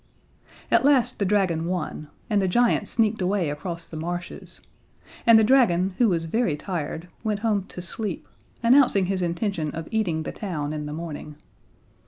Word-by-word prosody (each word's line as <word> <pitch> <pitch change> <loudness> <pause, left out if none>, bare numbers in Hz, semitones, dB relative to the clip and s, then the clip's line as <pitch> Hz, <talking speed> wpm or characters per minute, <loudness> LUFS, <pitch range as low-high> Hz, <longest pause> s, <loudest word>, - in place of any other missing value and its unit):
At - - +4
last 275 -3 +3
the 200 - +1
dragon 185 -5 +1
won, 175 -4 -3 0.2
and 210 -3 +2
the 190 - +1
giant 230 +1 +2
sneaked 220 -2 +1
away 180 -4 0
across 170 +3 -5
the - - -11
marshes, 175 +3 -6 0.7
and 230 -1 +9
the 220 - +5
dragon, 195 -7 +3
who 240 -3 +5
was 165 -3 0
very 175 -3 0
tired, 170 -1 -4 0.2
went 210 -2 -1
home 210 -4 +1
to 180 - -8
sleep, 195 0 -4 0.4
announcing 240 -5 +5
his 190 0 -1
intention 170 -2 -1
of 165 0 -5
eating 180 -8 0
the - - -4
town 155 -8 -4
in 150 -1 -4
the - - -5
morning. 155 -2 -7
185 Hz, 170 wpm, -25 LUFS, 165-215 Hz, 0.7 s, and